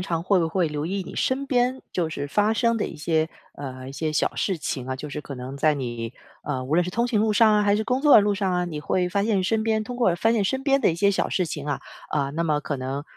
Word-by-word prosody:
常 170 -3 -2
会 185 +1 +3
不 165 -1 +1
会 175 -1 +1
留 150 +1 -3
意 195 +1 -2
你 - - -9
身 265 +2 0
边 255 0 +1
就 170 -3 0
是 145 -2 -4
发 210 +8 +2
生 230 0 +2
的 215 - -1
一 - - -8
些， 160 +1 0 0.3
呃， 130 -2 -7
一 - - -8
些 155 +3 -2
小 - - 0
事 190 - 0
情 135 -5 -4
啊， 130 - -2
就 145 +3 -7
是 150 - -4
可 145 - -8
能 130 +2 -7
在 155 +2 +3
你 120 -4 -4 0.3
呃， 135 -3 -2
无 135 +4 -2
论 175 +1 +4
是 180 - -4
通 235 +6 0
行 220 -4 +2
路 215 0 +2
上 215 0 +5
啊， 210 - +3
还 200 0 +4
是 215 - +1
工 250 +3 0
作 295 0 +6
的 - - +10
路 205 0 +1
上 190 -2 0
啊， 180 0 +1
你 160 -3 -5
会 180 +4 0
发 200 +3 0
现 210 -4 +1
身 220 +4 0
边 220 -1 +1
通 245 +3 -6
过 230 -8 +3
发 225 +6 +2
现 220 -3 +1
身 265 +7 -1
边 275 0 +3
的 180 - +3
一 - - -3
些 200 +4 +3
小 195 - 0
事 185 - 0
情 150 -3 -5
啊， 145 -2 -2 0.3
呃， 140 -2 0
那 165 +4 -2
么 150 -2 +1
可 145 0 -3
能 135 +2 -4
180 Hz, 320 characters per minute, -24 LUFS, 150-215 Hz, 0.3 s, 的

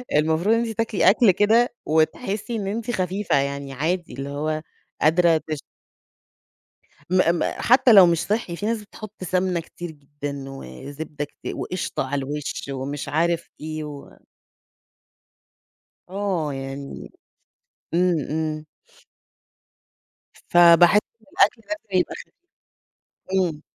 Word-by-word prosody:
المفروض 160 +8 +3
أنتِ 235 0 0
تاكلي 225 -3 +2
أكل 215 0 +5
كده 220 +6 +3
وتحسي 195 +9 0
إن 205 -3 -3
أنتِ 230 +4 -3
خفيفة، 190 -1 -1
يعني 140 0 -2
عادي 165 +3 -2
اللي 135 +2 -5
هو 155 +2 -2 0.4
قادرة 165 +1 +4
تش 155 -2 -3 1.5
م 185 - +2 0.2
م - - 0 0.2
حتى 250 0 +5
لو 195 -4 +9
مش 170 -1 +2
صحّي، 205 -5 -1
في 205 - -4
ناس 225 -1 -1
بتحط 210 -1 -10
سمنة 185 -1 0
كتير 175 +1 -8
جدًا، 145 -2 -7
وزبده 145 - -7
كتير، 145 - -8
وقشطه 185 - -3
على 145 - -2
الوش 145 0 -5
ومش 135 +1 -4
عارف 170 +2 0
إيه 155 0 -5
و 145 -1 -10 1.9
آه، 190 -6 -1
يعني 135 +1 -7 0.8
إمم، 175 -2 +3
إمم. 155 0 -2 1.8
فباحس 175 +3 +7 0.2
إن - - -24
الأكل 225 +3 +3
لازم 225 -12 -2
يبقى - - -2
خفي - - -12 1.1
إمم. 160 -5 -1
170 Hz, 120 wpm, -23 LUFS, 150-200 Hz, 1.9 s, لو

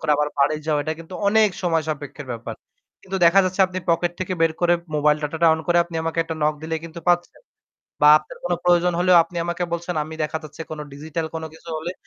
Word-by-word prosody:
করে 160 - -1
আবার 150 0 +1
বাড়ি 140 +2 +3
যাওয়া 150 -2 +1
এটা 155 - -2
কিন্তু 165 +3 -10
অনেক 215 0 +5
সময়সাপেক্ষ 155 -4 -2
ব্যাপার। 115 -1 -5 0.5
কিন্তু 190 0 -4
দেখা 170 +3 +6
যাচ্ছে 185 +1 -2
আপনি 185 0 -5
pocket 170 +1 +2
থেকে 185 0 -2
বের 165 -1 +3
করে 175 0 +4 0.2
mobile 150 0 +3
data-টা 160 +3 0
on 160 - -5
করে 175 - +2
আপনি 170 -1 -7
আমাকে 165 +1 -3
একটা 165 0 -5
knock 150 0 +2
দিলে 160 0 -3
কিন্তু 165 +1 -9
পাচ্ছেন। 175 0 +1 0.6
বা 150 - +8
আপনার 155 - -13
কোন 175 - -1
প্রয়োজন 175 0 +4
হলেও 180 0 +5
আপনি 175 +1 -12
আমাকে 175 +1 -2
বলছেন। 170 +1 -3
আমি 160 +1 -8
দেখা 155 +1 -3
যাচ্ছে 155 +2 -8
কোন 155 - -6
digital 160 +3 -4
কোন 160 - -4
কিছু 160 - -15
হলে 170 +3 -4
165 Hz, 220 wpm, -22 LUFS, 155-175 Hz, 0.6 s, বা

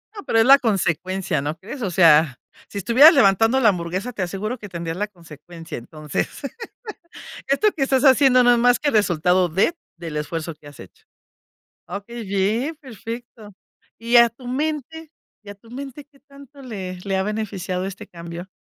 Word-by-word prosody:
No, 410 - -8
pero 225 - +2
es 225 - +5
la 275 +2 +8
consecuencia, 185 - -1
¿no 150 +3 -4
crees? 220 - -9
O 205 - -1
sea, 160 -6 +4 0.3
si - - -9
estuvieras 245 - +7
levantando 225 - +4
la 230 -5 +5
hamburguesa, 185 +5 -3
te - - -5
aseguro 200 +7 -4
que 205 - -9
tendrías 170 -1 -5
la 210 +2 -2
consecuencia. 165 -3 -11
Entonces, 150 +4 -4 1.2
esto 280 +10 +2
que 290 - 0
estás 270 +1 +1
haciendo 265 -1 +6
no 245 - +5
es - - +2
más 245 +1 +3
que 295 - 0
resultado 180 - +2
de 195 - +1 0.2
del 165 -3 -6
esfuerzo 165 +2 -4
que 150 -1 -17
has 145 -1 -14
hecho. 95 - -15 0.9
Okey, 205 +6 -7
bien, 210 +10 -1
perfecto. 230 -4 -10 0.4
Y 235 +2 +2
a 235 0 +8
tu 240 +2 -15
mente 305 +3 -4 0.3
y 205 - -11
a - - -8
tu 225 +3 -21
mente, 275 +2 -8
¿qué 280 - -25
tanto 280 0 -16
le 190 -7 -7
le 195 -1 -1
ha 190 - +1
beneficiado 195 -3 -3
este 195 0 -8
cambio? 170 +1 -9
205 Hz, 175 wpm, -21 LUFS, 175-250 Hz, 1.2 s, la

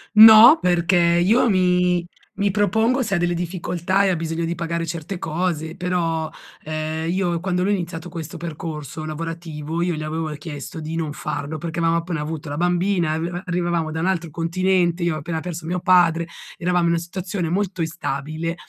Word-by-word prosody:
No, 220 +7 +10
perché 175 0 +2
io 175 +8 +4
mi 180 -2 +2 0.3
mi 200 0 0
propongo 220 +6 +2
se 200 -4 -1
ha - - +2
delle 175 0 +1
difficoltà 180 +2 -1
e - - +3
ha 185 - +2
bisogno 165 0 -2
di 170 +1 -2
pagare 170 0 -2
certe 165 +3 -5
cose, 160 -1 -2
però, 165 -3 -1 0.3
ehm, 155 +1 -3
io 175 -2 0
quando 180 0 -1
lui 200 +2 +2
ha - - +3
iniziato 170 -1 -5
questo 165 -1 -7
percorso 155 -2 -6
lavorativo, 165 0 -5
io 175 0 0
gli 155 - -4
avevo 155 +1 -3
chiesto 150 0 -7
di 160 +1 -5
non 160 -3 -2
farlo 150 0 -4
perché 165 +1 -5
avevamo 165 0 +2
appena 170 -2 -4
avuto 150 0 -5
la 145 - -4
bambina, 175 0 +1
e - - -1
arriva 175 +2 -4
arrivavamo 175 -3 -1
da 160 - -3
un 165 - -1
altro 170 -4 -1
continente, 175 +1 +1
io 170 -2 +1
ho - - -3
appena 160 +2 -3
perso 170 -2 -6
mio 180 +1 -2
padre, 175 -3 +4 0.3
eravamo 180 0 +1
in 170 - +3
una 170 - +2
situazione 180 +1 -4
molto 190 0 -1
instabile 160 +1 -3
170 Hz, 190 wpm, -22 LUFS, 160-180 Hz, 0.3 s, No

